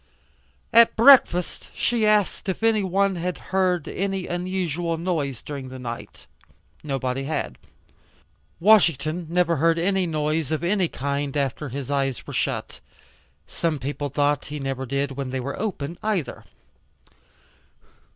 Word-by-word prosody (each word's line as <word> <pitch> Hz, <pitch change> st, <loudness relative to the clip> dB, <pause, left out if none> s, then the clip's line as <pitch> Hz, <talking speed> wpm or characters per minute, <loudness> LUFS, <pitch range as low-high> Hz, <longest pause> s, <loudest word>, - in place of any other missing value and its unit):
At 230 Hz, 0 st, +7 dB
breakfast 230 Hz, -8 st, +5 dB
she 230 Hz, -3 st, +1 dB
asked 210 Hz, -1 st, +1 dB
if 190 Hz, -, -3 dB
any 225 Hz, -2 st, +3 dB
one 195 Hz, 0 st, +1 dB
had 180 Hz, +1 st, -3 dB, 0.2 s
heard 185 Hz, -4 st, +1 dB
any 195 Hz, -1 st, -2 dB
unusual 175 Hz, -2 st, -2 dB
noise 155 Hz, -8 st, -2 dB
during 140 Hz, -3 st, -6 dB
the 130 Hz, -, -8 dB
night? 120 Hz, -2 st, -8 dB, 0.6 s
Nobody 135 Hz, -2 st, -2 dB
had. 140 Hz, -, -3 dB, 1.0 s
Washington 170 Hz, -5 st, +3 dB
never 170 Hz, -1 st, +2 dB
heard 165 Hz, +3 st, +3 dB
any 190 Hz, +1 st, +1 dB
noise 155 Hz, -1 st, -1 dB
of 155 Hz, 0 st, -1 dB
any 185 Hz, 0 st, +2 dB
kind 140 Hz, 0 st, -3 dB
after 140 Hz, +1 st, -2 dB
his 135 Hz, +1 st, -5 dB
eyes 135 Hz, -3 st, -1 dB
were -, -, -8 dB
shut. -, -, -2 dB, 0.7 s
Some 165 Hz, -3 st, -2 dB
people 145 Hz, +2 st, -4 dB
thought 145 Hz, +1 st, +1 dB
he 150 Hz, -, -6 dB
never 135 Hz, -1 st, -3 dB
did 140 Hz, +2 st, -1 dB
when 135 Hz, -1 st, -4 dB
they 130 Hz, 0 st, -3 dB
were 135 Hz, +3 st, -5 dB
open 170 Hz, -6 st, -4 dB
either. 210 Hz, -8 st, -2 dB
160 Hz, 135 wpm, -24 LUFS, 140-185 Hz, 1.0 s, At